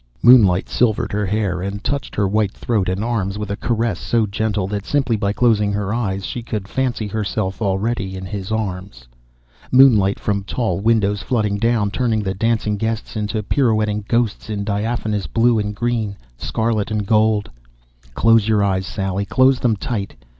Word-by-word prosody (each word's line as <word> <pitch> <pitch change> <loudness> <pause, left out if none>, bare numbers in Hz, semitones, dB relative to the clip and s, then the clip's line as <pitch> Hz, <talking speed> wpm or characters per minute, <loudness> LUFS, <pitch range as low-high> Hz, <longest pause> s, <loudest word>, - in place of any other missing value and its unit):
Moonlight 100 -7 +6
silvered 115 -4 0
her 105 -1 -1
hair 100 -3 -1
and 100 +2 -5
touched 140 0 -3
her 100 - +1
white 105 0 +1
throat 105 -6 -1
and 95 +3 -2
arms 105 -4 -1
with 105 -1 -4
a - - -1
caress 115 -4 -1
so 115 -2 +1
gentle 105 -1 -1
that 100 +1 -3
simply 135 -2 0
by 100 -1 -1
closing 105 -2 +2
her 100 0 -2
eyes 100 -5 -2
she 120 - -4
could 105 -4 -5
fancy 125 -2 -1
herself 105 -1 -3
already 95 -1 -1
in 95 0 -6
his 95 +1 -5
arms. 95 - -4 0.6
Moonlight 115 -7 +5
from 100 -1 -1
tall 100 -4 -2
windows 105 -2 +1
flooding 105 -2 -1
down, 115 -3 +1
turning 110 -2 0
the 95 -1 -2
dancing 110 0 0
guests 115 +2 -3
into 105 0 -2
pirouetting 110 -3 +1
ghosts 115 -2 0
in 105 -2 -2
diaphanous 105 0 -2
blue 115 0 +2
and 105 0 -3
green, 115 -3 -1 0.2
scarlet 110 - -1
and 105 -2 -2
gold. 110 0 +2 0.6
_Close 115 -2 +4
your 105 -2 +3
eyes, 95 -1 0
Sally, 95 0 -2
close 130 0 +3
them 115 -3 +2
tight! 100 -1 -4
105 Hz, 170 wpm, -20 LUFS, 100-115 Hz, 0.6 s, Moonlight